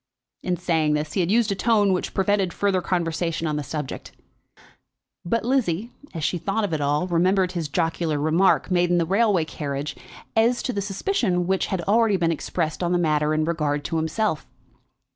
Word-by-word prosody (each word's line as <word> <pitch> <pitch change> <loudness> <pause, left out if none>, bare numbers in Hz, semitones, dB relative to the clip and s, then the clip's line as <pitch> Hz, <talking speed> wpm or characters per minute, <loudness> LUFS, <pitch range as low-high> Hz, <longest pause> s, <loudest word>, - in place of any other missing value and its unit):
In 180 -1 -1
saying 155 -3 +1
this 150 0 -3
he - - -1
had 175 -1 +1
used 220 0 +3
a - - +2
tone 205 -1 +3
which 180 - -3
prevented 195 -2 +1
further 195 -2 +1
conversation 165 -2 -1
on 155 -1 -1
the 150 - -1
subject, 150 -1 -6 1.1
but 230 +7 -1
Lizzie, 235 -4 0 0.2
as 165 -3 -5
she 175 - 0
thought 210 +6 -1
of 200 - -2
it 155 - -1
all, 145 +4 +1
remembered 185 +1 +2
his 170 -4 -3
jocular 165 0 -1
remark, 160 +6 +2
made 175 -1 +2
in 175 - +3
the 170 - +2
railway 195 -2 +2
carriage, 145 -2 -4 0.4
as 230 +2 +2
to 255 - -2
the 200 - -2
suspicion 195 - 0
which 190 +1 0
had 190 -3 -2
already 210 +2 +3
been 170 -2 +1
expressed 160 0 -3
on 175 0 0
the - - +3
matter 155 -3 +1
in 155 0 +1
regard 150 -3 -1
to 165 - -2
himself. 160 0 -1
175 Hz, 190 wpm, -24 LUFS, 155-200 Hz, 1.1 s, used